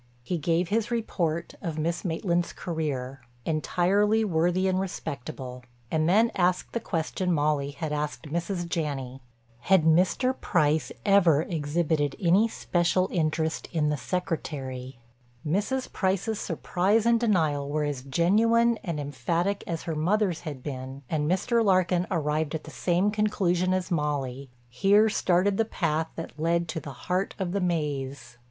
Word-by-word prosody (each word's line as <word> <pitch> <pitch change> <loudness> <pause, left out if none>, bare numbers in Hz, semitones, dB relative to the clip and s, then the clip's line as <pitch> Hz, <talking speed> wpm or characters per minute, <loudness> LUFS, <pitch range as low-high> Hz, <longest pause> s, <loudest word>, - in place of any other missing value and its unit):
He 170 +7 -2
gave 170 +3 +1
his 220 +1 0
report 175 -8 -1
of 165 -5 -4
Miss 165 +2 -1
Maitland's 170 0 -1
career—entirely 160 - -1
worthy 180 +1 +1
and 185 0 +1
respectable—and 125 -4 -4
then 220 +5 +4
asked 180 0 0
the 235 - 0
question 180 -2 -2
Molly 145 -3 +1
had 150 +2 -4
asked 150 0 -3
Mrs. 175 +2 -2
Janney: 135 -6 -3 0.4
had 185 +6 +4
Mr. 185 +10 +3
Price 155 -3 +1
ever 180 -7 +5
exhibited 155 -2 0
any 190 +4 +4
special 185 -3 0
interest 160 -1 -1
in 155 -3 +1
the 150 - +1
secretary? 135 -7 -4 0.5
Mrs. 210 - -1
Price's 195 +3 0
surprise 190 +5 +1
and 235 0 +4
denial 160 -11 +1
were 150 +1 0
as 145 -3 -2
genuine 220 - +3
and 165 -4 -3
emphatic 165 +8 -1
as 165 -2 -3
her 165 - -3
mother's 180 +2 +1
had 145 -6 -7
been 135 -1 -6
and 150 -1 0
Mr. 230 +6 +2
Larkin 185 -3 +2
arrived 155 -2 0
at 155 - -4
the 160 - -10
same 180 +5 +1
conclusion 185 -4 +1
as 185 0 -1
Molly—here 140 - +1
started 190 0 +2
the 225 - +3
path 160 -7 -1
that 165 -1 -7
led 170 +1 +1
to 160 - -2
the 150 - -8 0.2
heart 185 +2 -1
of 185 -3 -2
the 200 +1 -1
maze. 140 -7 -2
170 Hz, 140 wpm, -27 LUFS, 150-190 Hz, 0.5 s, ever